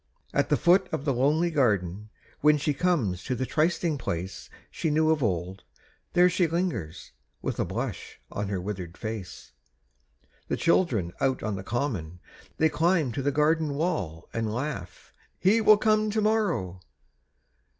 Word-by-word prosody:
At - - +1
the - - +3
foot 180 +3 +4
of 140 - -3
the 140 - +2
lonely 150 +7 +2
garden, 105 - 0 0.3
When 150 +1 +5
she 150 +1 0
comes 135 - 0
to 130 - -1
the 130 - -2
trysting 160 0 0
place 90 -3 -4 0.2
She 160 - -2
knew 155 +1 +3
of 155 -2 +1
old, 95 -3 -2 0.5
there 180 0 +6
she 180 -1 +2
lingers, 160 - -3 0.3
With - - -3
a - - +1
blush - - -5
on 100 0 -3
her 100 -2 -2
withered 90 -2 -6
face. 110 -5 -7 1.0
The - - -1
children 125 - +2
out 130 -1 +1
on 110 - -1
the 95 - -5
common: 95 - -3 0.4
They 160 - +4
climb 160 -2 +1
to 135 - -3
the 145 +2 +1
garden 150 0 +1
wall; 90 - -2
And 115 -2 -1
laugh: 120 -7 -5 0.2
"He 215 +5 +3
will 215 -1 +7
come 215 0 +2
to 215 +1 0
morrow!" 200 - 0
140 Hz, 160 wpm, -27 LUFS, -, 1.0 s, will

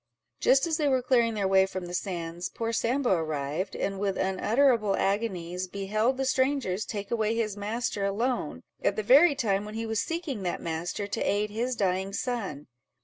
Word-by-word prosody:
Just 270 +3 +4
as 320 -2 0
they 300 - +1
were 260 -2 +2
clearing 235 -3 +3
their 200 -2 0
way 190 0 +4
from 185 -1 -5
the 175 - -7
sands, 175 -2 -3
poor 230 0 -3
Sambo 245 +2 +1
arrived, 155 +1 -1
and 195 -1 -2
with 195 -1 -1
unutterable 215 +3 +2
agonies 185 -3 -1
beheld 215 +7 0
the 270 - -1
strangers 260 -7 +1
take 205 -2 -5
away 220 -1 +1
his 215 -3 -1
master 210 0 -2
alone, 230 +6 -1 0.2
at - - +2
the 215 - -2
very 285 - +6
time 200 -6 0
when 210 +1 -8
he 225 +1 -3
was 220 0 0
seeking 325 - -3
that 180 -2 -2
master, 170 +5 -3
to 200 - -4
aid 210 +1 0
his 240 +4 -1
dying 190 -1 0
son. 200 - -3
210 Hz, 185 wpm, -28 LUFS, 190-240 Hz, 0.2 s, very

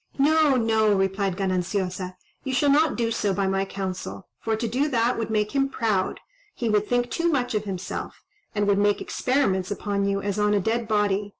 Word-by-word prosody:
"No, 300 0 +4
no," 220 -3 +3
replied 195 -1 0
Gananciosa, 185 -1 -2 0.3
"you 265 -2 -2
shall 285 +2 +3
not 300 +1 +3
do 230 -1 0
so 205 -4 0
by 195 - 0
my 195 0 0
counsel; 185 - -5
for 225 0 -1
to 230 +2 -2
do 260 +6 0
that 240 -2 +2
would 225 -1 -3
make 210 -1 0
him 275 -1 +1
proud; 215 -8 -1 0.4
he 235 - -2
would 210 -1 +2
think 245 0 0
too 340 0 +1
much 250 -5 0
of 210 -1 -1
himself, 190 -2 -5 0.3
and 205 -1 +1
would 200 -1 +3
make 205 0 +2
experiments 195 -9 0
upon 200 -1 -1
you 195 0 0
as 200 0 -2
on 210 0 +3
a - - +3
dead 225 +3 -1
body. 205 -1 +1
210 Hz, 200 wpm, -25 LUFS, 195-240 Hz, 0.4 s, No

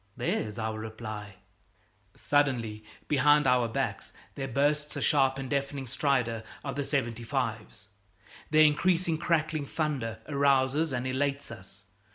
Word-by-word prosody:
There's 105 0 -2
our 110 -1 -3
reply! 110 -2 -7 0.8
Suddenly, 120 -7 0 0.2
behind 145 +1 +4
our 125 -2 +3
backs, 115 - -3 0.2
there 135 -1 -4
bursts 145 +3 0
the - - -2
sharp 135 -2 +3
and 135 -1 -4
deafening 140 0 -2
stridor 125 -3 0 0.2
of 140 -2 -4
the 145 - -1
75's. 115 -6 -3 0.6
Their 155 0 +6
increasing 165 +2 +2
crackling 160 -3 0
thunder 135 -9 -2
arouses 140 +1 +2
and 125 -1 -2
elates 140 +2 -1
us. - - -12
135 Hz, 125 wpm, -29 LUFS, 115-145 Hz, 0.8 s, Their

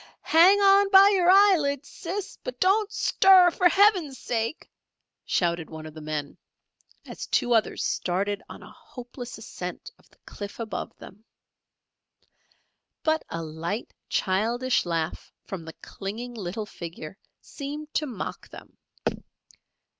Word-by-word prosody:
"Hang 360 +5 +7
on 395 0 +5
by 390 0 +8
your 370 -3 +3
eyelids, 335 -8 +4
Sis! 390 +4 -6
but - - -6
don't 410 +3 +2
stir 380 -4 +5
for 355 +1 +3
Heaven's 370 -8 +3
sake!" 230 +5 -3 0.6
shouted 170 -3 0
one 160 -1 -9
of 155 - -9
the 155 - -10
men, 150 -2 -5 0.7
as - - -8
two 245 - +1
others 225 -1 +1
started 195 +3 -1
on - - -10
a - - -13
hopeless 245 0 -10
ascent - - -7
of - - -26
the - - -27
cliff 205 +2 -8
above 225 -2 -5
them. 210 +3 -14 1.8
But 315 0 +1
a 165 0 -4
light 165 +7 -5 0.2
childish 230 +4 0
laugh 165 -2 -3
from 180 -4 -7
the 160 - -9
clinging 225 +5 -6
little 210 0 -5
figure 170 -2 -9 0.2
seemed 295 +1 -8
to 305 - 0
mock 235 -7 -6
them! - - -14
245 Hz, 130 wpm, -26 LUFS, -, 1.8 s, by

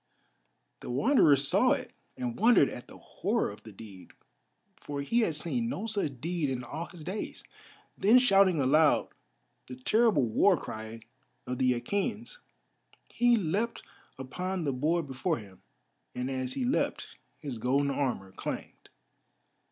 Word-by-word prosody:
The - - -9
Wanderer 155 - +4
saw 140 0 +3
it - - -5 0.3
and 120 -2 -3
wondered 225 - +5
at 125 - -9
the - - -13
horror - - -2
of 100 - -13
the 110 - -12
deed, 100 -2 -13 0.6
for 145 -1 -6
he 230 +12 +1
had 195 -9 +1
seen 230 +10 -1
no 235 -4 -4
such 200 - -2
deed 165 0 -2
in 125 -2 -3
all 155 +7 -5
his 175 -3 -12
days. 190 +6 -5 0.5
Then 215 +6 +5
shouting 195 - +4
aloud 150 +3 +3 0.6
the 125 - -8
terrible 210 - +2
war 170 - +3
cry 110 -2 -8 0.4
of 125 0 -4
the 125 -2 +2
Achæans 210 - -3 0.7
he 240 -1 +3
leapt 205 +5 -2 0.3
upon 180 +8 -4
the 140 -3 -1
board 160 +6 0
before 145 +5 -2
him, 100 -4 -13 0.5
and 125 +2 -3
as 130 -1 -3
he 255 - -2
leapt 255 - -2 0.2
his 135 -7 -6
golden 140 +4 +1
armour 125 -9 -2
clanged. - - -7
145 Hz, 145 wpm, -29 LUFS, 125-200 Hz, 0.7 s, wondered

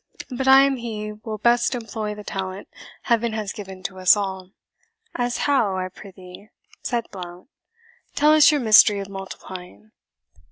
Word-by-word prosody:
But 265 +1 -3
I 265 0 +8
am 275 -1 +1
he 215 -3 -5
will 215 0 -7
best 235 +4 +2
employ 220 -2 -5
the 210 - -10
talent 190 -1 -6 0.4
Heaven 235 -1 0
has 215 -3 -4
given 190 -2 -10
to 185 +1 -6
us 185 +3 +5
all." 190 -2 -4 0.6
"As 245 -1 -2
how, 225 -10 +1
I 185 0 -3
prithee?" 185 +1 -14 0.3
said 235 -2 -2
Blount; 180 +3 -10 0.7
"tell 300 +1 +4
us 310 -1 +7
your 295 -2 0
mystery 215 -2 +6
of 195 0 -6
multiplying." 195 +1 -10
210 Hz, 155 wpm, -22 LUFS, 190-235 Hz, 0.7 s, I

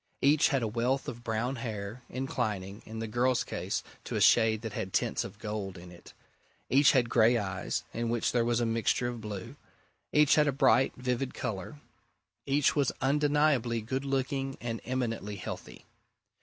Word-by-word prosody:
Each 145 +2 +5
had 135 -4 +1
a - - +1
wealth 120 +5 0
of 120 0 -6
brown 120 +3 -1
hair, 110 0 -5
inclining, 110 -6 -3
in 110 - -7
the 115 0 -3
girl's 120 +3 +1
case - - -3 0.2
to - - -4
a - - +1
shade 110 -1 +4
that 110 -3 -5
had 95 -2 -4
tints - - +1
of - - -9
gold 105 -3 -5
in 90 0 -11
it; 85 - -14 0.6
each 135 +2 +6
had 125 -4 +3
grey 115 +1 +4
eyes, 95 -4 -2
in 115 0 -2
which 120 -1 0
there 120 -1 +2
was 120 0 +1
a 120 - +1
mixture 115 +2 +1
of 120 -2 -6
blue; 105 -3 -7 0.5
each 150 -1 +5
had 150 -1 +4
a - - +3
bright, 135 -1 +3
vivid 125 +1 -2
colour; 115 +8 -5 0.7
each 140 0 +3
was 140 -4 +2
undeniably 145 -4 +2
good 130 +5 -3
looking 135 0 -1
and 115 -2 -4
eminently 115 -5 -2
healthy. 95 - -8
120 Hz, 175 wpm, -30 LUFS, 110-135 Hz, 0.7 s, each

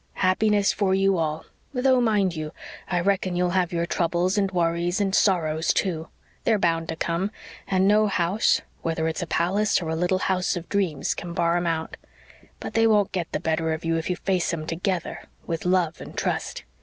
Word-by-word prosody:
Happiness 200 +2 +2
for 195 -2 +1
you 195 -1 +2
all 155 0 -2 0.3
though, 255 0 +3
mind 205 -6 +2
you, 155 -1 -5 0.3
I 180 - 0
reckon 185 -1 0
you'll 180 0 +1
have 180 0 +1
your 170 -1 0
troubles 175 +2 0
and 200 -2 +1
worries 175 +1 0
and 195 -2 0
sorrows, 160 -6 +2
too. 165 -4 -1 0.4
They're 220 - +3
bound 165 -3 +1
to 160 - -2
come 170 +4 -1 0.4
and 190 0 +2
no 210 +1 +4
house, 195 +2 +2 0.2
whether 160 -1 -1
it's 160 +3 -2
a 175 - -3
palace 195 +6 +1
or 165 -3 -4
a 160 - -1
little 180 +3 +1
house 185 0 +1
of 175 -1 -6
dreams, 185 -8 0
can 175 -1 -6
bar 170 0 +2
'em 175 0 0
out. 160 -1 -2 0.6
But - - -6
they 225 +1 +4
won't 210 -3 +3
get 175 -3 -3
the - - -1
better 160 0 0
of 160 +1 -5
you 165 0 +1
if 165 +1 -2
you 180 - +1
face 185 -1 0
'em 155 -2 -4
TOGETHER 175 +2 -3 0.2
with 165 -1 -4
love 180 -3 +1
and - - -10
trust. - - -2
180 Hz, 200 wpm, -25 LUFS, 165-195 Hz, 0.6 s, no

